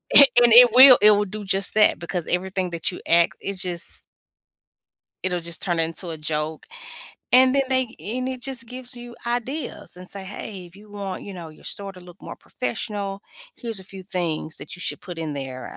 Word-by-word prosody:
And 280 Hz, -, +12 dB, 0.3 s
it 245 Hz, +1 st, +10 dB
will, 255 Hz, 0 st, +10 dB
it 210 Hz, -, +8 dB
will 205 Hz, 0 st, +2 dB
do 210 Hz, +2 st, -8 dB
just 195 Hz, 0 st, -1 dB
that 215 Hz, -1 st, +4 dB
because 170 Hz, 0 st, -4 dB
everything 185 Hz, +1 st, -2 dB
that 170 Hz, -2 st, -2 dB
you 180 Hz, -, -9 dB
ask, 170 Hz, 0 st, +4 dB
it 200 Hz, -1 st, -4 dB
just 180 Hz, -2 st, -3 dB, 1.2 s
it'll 180 Hz, -1 st, -1 dB
just 170 Hz, 0 st, -2 dB
turn 175 Hz, -3 st, -1 dB
into 165 Hz, +2 st, -3 dB
a 160 Hz, -1 st, -7 dB
joke. 150 Hz, +1 st, -4 dB, 0.6 s
And 255 Hz, +1 st, +6 dB
then 275 Hz, -, +3 dB
they 260 Hz, -1 st, +1 dB
and 255 Hz, +5 st, -4 dB
it 255 Hz, -1 st, -6 dB
just 250 Hz, -3 st, -1 dB
gives 250 Hz, +1 st, -9 dB
you 240 Hz, 0 st, -10 dB
ideas 245 Hz, -, -4 dB
and 180 Hz, 0 st, -11 dB
say, 195 Hz, -1 st, -6 dB
"Hey, 190 Hz, -1 st, -8 dB
if 170 Hz, -, -19 dB
you 205 Hz, +1 st, -17 dB
want, 200 Hz, -2 st, -6 dB
you 200 Hz, -, -9 dB
know, 170 Hz, -4 st, -9 dB
your 155 Hz, -, -18 dB
store 200 Hz, -1 st, -5 dB
to 185 Hz, -, -14 dB
look 180 Hz, 0 st, -15 dB
more -, -, -9 dB
professional, 205 Hz, -5 st, -5 dB, 0.3 s
here's 230 Hz, -3 st, -5 dB
a 190 Hz, -, -10 dB
few 190 Hz, 0 st, -9 dB
things 170 Hz, -4 st, -3 dB
that 145 Hz, -, -8 dB
you 175 Hz, -, -9 dB
should -, -, -3 dB
put 175 Hz, -3 st, -9 dB
in 155 Hz, -2 st, -4 dB
there. 135 Hz, -2 st, -7 dB
195 Hz, 205 wpm, -23 LUFS, 170-235 Hz, 1.2 s, And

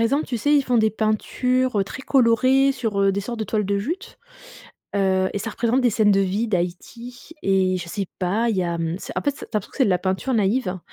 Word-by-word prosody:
exemple, 275 Hz, +7 st, +1 dB
tu 245 Hz, -, -3 dB
sais, 290 Hz, +6 st, +2 dB
ils 285 Hz, -, +4 dB
font 245 Hz, -1 st, +1 dB
des 220 Hz, 0 st, +3 dB
peintures, 250 Hz, +3 st, 0 dB
heu, 195 Hz, -, +2 dB
très 260 Hz, +7 st, -8 dB
colorées 265 Hz, +2 st, +3 dB
sur, 225 Hz, -6 st, -2 dB
heu, 195 Hz, 0 st, +3 dB
des 200 Hz, -, -1 dB
sortes 235 Hz, +3 st, -6 dB
de 220 Hz, -, -2 dB
toiles 210 Hz, -1 st, -1 dB
de 200 Hz, +1 st, 0 dB
jute, 330 Hz, -, -5 dB, 0.8 s
heu, 190 Hz, -1 st, +2 dB
et 205 Hz, -, -2 dB
ça 225 Hz, -, -4 dB
représente 235 Hz, +4 st, 0 dB
des 245 Hz, -, +3 dB
scènes 210 Hz, -1 st, +3 dB
de 195 Hz, -, +3 dB
vie 200 Hz, +4 st, 0 dB
d'Haïti 225 Hz, -, -5 dB
et 190 Hz, -1 st, +2 dB
je 175 Hz, -1 st, -7 dB
sais 195 Hz, +1 st, -3 dB
pas, 205 Hz, +6 st, 0 dB
il 210 Hz, -, -1 dB
y 185 Hz, -, +1 dB
a, 170 Hz, -1 st, -2 dB
mmh, 165 Hz, +1 st, -2 dB, 0.2 s
en -, -, +1 dB
fait, 285 Hz, -, +1 dB
tu -, -, -18 dB
as -, -, -15 dB
l'impression 210 Hz, -, -2 dB
que -, -, -13 dB
c'est 265 Hz, -, +5 dB
de 200 Hz, -, +1 dB
la 180 Hz, -, +2 dB
peinture 190 Hz, +8 st, -1 dB
naïve, 200 Hz, -2 st, 0 dB
215 Hz, 255 wpm, -22 LUFS, 190-250 Hz, 0.8 s, c'est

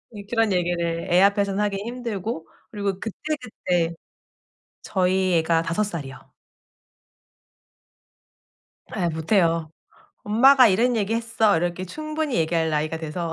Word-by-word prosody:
예 205 Hz, -, -8 dB
그런 225 Hz, -3 st, +1 dB
얘기를 170 Hz, -1 st, -1 dB
애 180 Hz, +2 st, +5 dB
앞에선 200 Hz, 0 st, +2 dB
하기 205 Hz, -1 st, 0 dB
힘들고 225 Hz, -5 st, -5 dB, 0.2 s
그리고 200 Hz, -3 st, -3 dB
그때그때 215 Hz, -, -3 dB, 0.9 s
저희 185 Hz, -1 st, +1 dB
애가 165 Hz, 0 st, +1 dB
5 165 Hz, +5 st, -1 dB
살이요. 155 Hz, -10 st, -6 dB, 2.8 s
예. 175 Hz, -, +1 dB
못해요. 165 Hz, -1 st, +1 dB, 0.5 s
"엄마가 250 Hz, +4 st, +6 dB
이런 235 Hz, +5 st, +2 dB
얘기했어." 225 Hz, -1 st, +1 dB
이렇게 175 Hz, +2 st, -2 dB
충분히 310 Hz, -, -3 dB
얘기할 160 Hz, 0 st, +1 dB
나이가 155 Hz, +1 st, -1 dB
돼서 165 Hz, +1 st, -4 dB
190 Hz, 250 characters per minute, -23 LUFS, 170-220 Hz, 2.8 s, 엄마가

